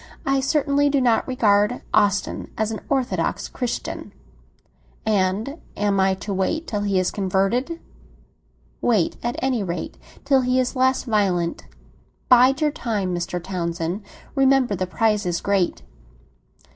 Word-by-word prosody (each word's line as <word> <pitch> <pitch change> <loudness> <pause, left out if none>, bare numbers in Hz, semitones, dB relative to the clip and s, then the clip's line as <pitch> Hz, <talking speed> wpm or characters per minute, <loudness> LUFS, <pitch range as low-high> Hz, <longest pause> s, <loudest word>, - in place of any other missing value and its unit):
"I 275 0 +2
certainly 285 +1 +2
do 280 -1 +2
not 240 -3 +2
regard 210 -2 +2
Austin 205 -1 +1
as 220 0 0
a 220 - -5
satisfactory 265 -3 -1
Christian." 245 -2 -4 0.9
"And 215 - 0 0.2
am 205 -1 +1
I 190 0 +3
to 200 +2 -5
wait 195 - -1
till 210 -8 -3
he 200 -2 0
is 185 -1 +1
converted?" 200 - 0 1.0
"Wait, 215 -8 +1
at 240 +1 -2
any 260 -4 +1
rate, 175 -3 -4 0.3
till 275 -2 +4
he 250 0 +1
is 255 +2 -1
less 260 0 +2
violent. 195 -7 0 0.6
Bide 255 +3 +6
your 300 -1 +3
time, 210 - -2
Mr. 175 0 -2
Townsend; 170 0 -3 0.3
remember 270 -5 +3
the 185 0 -2
prize 210 0 +1
is 175 -1 0
great!" 195 -3 0
215 Hz, 135 wpm, -22 LUFS, 190-260 Hz, 1.0 s, Bide